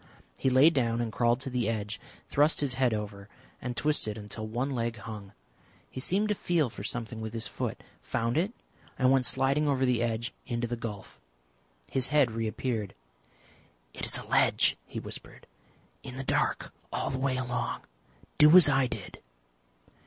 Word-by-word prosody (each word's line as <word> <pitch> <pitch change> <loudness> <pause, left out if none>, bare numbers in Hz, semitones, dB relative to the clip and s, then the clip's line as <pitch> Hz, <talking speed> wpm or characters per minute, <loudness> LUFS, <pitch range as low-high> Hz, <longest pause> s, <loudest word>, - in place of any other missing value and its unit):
He - - +2
lay 130 +5 +6
down 120 -6 +1
and 115 -2 -1
crawled 120 0 +2
to 135 -2 -5
the 125 -3 0
edge, 105 -2 -3 0.3
thrust 150 +3 +3
his 140 -3 +1
head 130 -2 +2
over 105 -2 -5 0.3
and 125 -1 -4
twisted 145 -8 +1
until 110 +1 -6
one 125 +5 -2
leg 120 -2 -2
hung. 100 -2 -8 0.6
He - - -6
seemed 200 +10 +1
to - - +3
feel 170 - +1
for 100 - -8
something 115 0 -4
with 110 0 -5
his 115 -1 -1
foot, - - -4 0.2
found 115 +2 -1
it, 180 +7 +1 0.5
and 130 0 +4
went 130 -1 +3
sliding 135 +3 +2
over 135 -2 +2
the 125 -2 +2
edge 120 0 -1
into 120 -2 -1
the 120 +1 -2
gulf. 105 -4 -7 0.7
His 130 -2 +1
head 145 -5 +3
reappeared. 110 -1 -2 1.0
"It - - -4
is - - +3
a - - -7
ledge," - - +4
he - - -5
whispered. - - -9 0.6
"In 125 - -8
the 135 - -3
dark - - 0 0.2
all - - -1
the 130 - -2
way 130 -1 0
along. 125 -1 -2 0.6
Do 150 +4 +9
as 180 - +9
I 135 -2 +3
did." - - -7
125 Hz, 175 wpm, -29 LUFS, 115-135 Hz, 1.0 s, Do